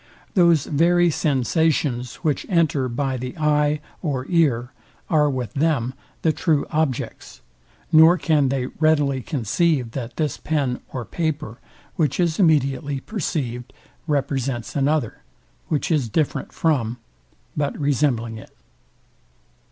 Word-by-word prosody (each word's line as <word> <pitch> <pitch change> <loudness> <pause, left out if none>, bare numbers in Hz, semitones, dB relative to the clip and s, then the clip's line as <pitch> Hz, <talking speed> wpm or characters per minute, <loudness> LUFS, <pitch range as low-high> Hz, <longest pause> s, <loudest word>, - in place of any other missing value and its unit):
Those 170 -5 +4
very 175 +3 +3
sensations, 140 -3 0
which 150 -4 0
enter 155 -7 +2
by 130 +2 -2
the 125 +6 -6
eye 150 -1 +2 0.2
or 135 -6 -2
ear, 130 -8 +2 0.4
are 150 -2 +4
with 125 -6 -3
them 140 -5 0 0.3
the 160 - +3
true 155 -4 +1
objects, 155 -5 -2 0.5
nor 160 +3 +7
can 150 -5 +2
they 130 -1 -1
readily 145 -2 +1
conceive 135 - 0
that 120 -2 -6
this 150 -3 -1
pen 140 -5 -1
or 125 -3 -5
paper, 150 -7 -3 0.4
which 150 -2 0
is 170 -1 +1
immediately 140 -5 +2
perceivd, 135 - -3 0.4
represents 135 -5 -1
another, 145 -3 0 0.5
which 150 +2 -1
is 140 -7 +1
different 150 +6 -1
from, 125 -8 0 0.6
but 145 -1 -1
resembling 130 -6 0
it. - - -16
145 Hz, 120 wpm, -22 LUFS, 130-160 Hz, 0.6 s, nor